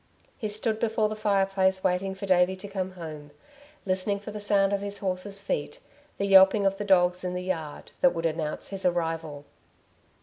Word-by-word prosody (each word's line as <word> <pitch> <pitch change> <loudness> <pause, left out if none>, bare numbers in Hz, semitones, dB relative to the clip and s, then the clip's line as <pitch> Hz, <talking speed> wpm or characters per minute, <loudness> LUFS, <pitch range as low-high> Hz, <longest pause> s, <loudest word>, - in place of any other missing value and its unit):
He 215 - -4
stood 215 +1 -1
before 220 -2 +1
the 215 - -4
fireplace 195 -2 +1
waiting 190 +1 0
for 195 +1 -6
Davey 185 0 +3
to 190 +2 -9
come 190 -2 -4
home, 155 -4 -8 0.6
listening 190 +2 0
for 205 +1 -8
the 210 0 -7
sound 200 -1 +2
of 200 - 0
his 200 0 -4
horse's 195 +1 -3
feet, 150 -7 -3 0.4
the 200 - -1
yelping 195 +1 +6
of 195 0 +1
the 205 - -3
dogs 180 -2 +3
in 180 0 -3
the 180 - -3
yard 165 -5 -5
that 270 - +4
would 165 0 -3
announce 155 -1 -2
his 195 -1 -4
arrival. 165 -4 -2
190 Hz, 190 wpm, -27 LUFS, 180-200 Hz, 0.6 s, yelping